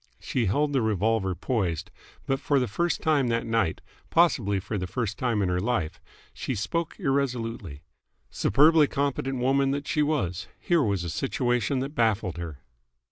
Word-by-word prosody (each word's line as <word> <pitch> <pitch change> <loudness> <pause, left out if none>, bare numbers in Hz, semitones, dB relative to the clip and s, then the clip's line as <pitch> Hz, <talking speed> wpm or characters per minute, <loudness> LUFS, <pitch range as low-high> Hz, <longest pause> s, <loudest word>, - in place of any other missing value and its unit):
She 120 -5 -1
held 145 +9 +1
the 135 - +2
revolver 110 -2 +1
poised, 95 - -2 0.3
but 135 0 0
for 145 -3 +1
the 125 - 0
first 170 +5 -1
time 145 -5 +3
that 115 0 0
night 115 -7 0 0.3
possibly 115 - +3
for 105 +2 -4
the 90 - -3
first 105 0 -3
time 115 -5 +1
in 90 - 0
her 90 0 +1
life 95 -6 -1 0.3
she 130 - -3
spoke 165 - -3
irresolutely. 120 - -2 0.5
Superbly 150 +5 +5
competent 135 -1 -1
woman 135 +2 +2
though 140 +1 0
she 150 - 0
was, 105 - -1
here 170 -2 +2
was 100 -8 0
a 85 - -4
situation 125 - 0
that 135 +2 -4
baffled 110 - +1
her. 80 -5 -7
120 Hz, 165 wpm, -26 LUFS, 100-140 Hz, 0.5 s, Superbly